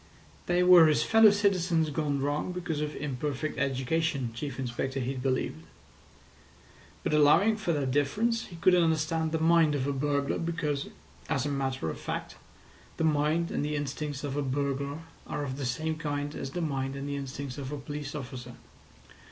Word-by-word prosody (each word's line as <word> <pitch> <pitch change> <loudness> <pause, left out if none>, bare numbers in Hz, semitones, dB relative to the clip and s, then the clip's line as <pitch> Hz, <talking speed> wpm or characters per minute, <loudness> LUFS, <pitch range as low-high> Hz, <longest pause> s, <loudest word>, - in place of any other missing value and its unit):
They 175 0 +3
were 180 -3 +8
his 155 - +3
fellow 225 -1 +7
citizens 180 -6 +2
gone 145 -2 -1
wrong 145 +5 -1
because 170 -4 -3
of 150 0 -3
imperfect 145 +1 -3
education, 140 0 0
Chief 135 +2 -5
Inspector 130 +1 -3
Heat 130 +1 -3
believed; 130 -10 -1 1.4
but - - -1
allowing 150 +9 +5
for 215 -5 -2
that 140 -4 0
difference, 215 - +1
he 175 - -11
could 180 +2 +4
understand 160 -2 +2
the 160 - +1
mind 165 -2 +4
of 135 -2 -1
a 140 - 0
burglar, 140 0 0
because, 155 -4 -2 0.4
as 135 -1 0
a - - 0
matter 135 - -2
of - - -8
fact, - - -5 0.6
the - - 0
mind 155 +2 +2
and - - -1
the 150 0 -1
instincts 145 0 -3
of 140 -1 -3
a 145 - 0
burglar 140 +2 -2 0.3
are 145 - -3
of 130 -2 -4
the 140 -3 -2
same 155 +6 -1
kind 145 -2 -3
as 135 - -5
the 175 +6 -4
mind 135 -4 -2
and 140 +1 -5
the 145 - -2
instincts 140 -1 -5
of 135 0 -5
a 150 - -3
police 145 +1 -6
officer. 125 -3 -7
145 Hz, 175 wpm, -29 LUFS, 135-160 Hz, 1.4 s, were